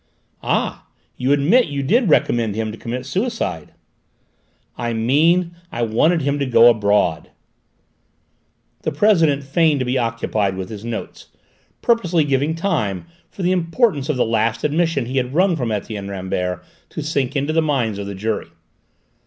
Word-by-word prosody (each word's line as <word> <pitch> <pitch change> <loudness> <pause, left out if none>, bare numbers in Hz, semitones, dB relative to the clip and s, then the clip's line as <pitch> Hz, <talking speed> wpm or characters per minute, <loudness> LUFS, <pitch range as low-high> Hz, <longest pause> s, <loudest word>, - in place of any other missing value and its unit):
"Ah, - - -2 0.3
you 130 +2 -1
admit 165 - +4
you 140 -1 -3
did 220 - +2
recommend 115 -7 +2
him 110 0 -2
to 110 - -9
commit 125 +2 -5
suicide?" 195 - -3 1.0
"I 120 0 -3
mean 160 +10 +2 0.2
I 120 - -2
wanted 150 +9 +2
him 140 +1 0
to 140 - 0
go 120 -1 +7
abroad." 100 -6 +1 1.5
The 155 - -2
president 160 -5 +3
feigned 150 +2 +2
to 130 - -1
be 125 +1 0
occupied 110 -4 -1
with 95 -1 -5
his 105 -1 -8
notes, 115 -1 -6 0.6
purposely 180 -9 +2
giving 145 +2 0
time 155 - -1 0.2
for 190 - -7
the 180 - +2
importance 170 - +1
of 150 - 0
the - - +2
last 115 +1 0
admission 155 -3 +1
he 130 +3 -4
had 130 +1 -1
wrung 185 0 +3
from 125 -7 -2
Etienne 105 -1 -4
Rambert 90 -2 -3 0.2
to 155 - -6
sink 140 -3 -1
into 140 +2 0
the 165 - +3
minds 125 -9 -1
of 100 - -5
the 100 - -6
jury. 105 +2 -3
135 Hz, 160 wpm, -20 LUFS, 110-160 Hz, 1.5 s, go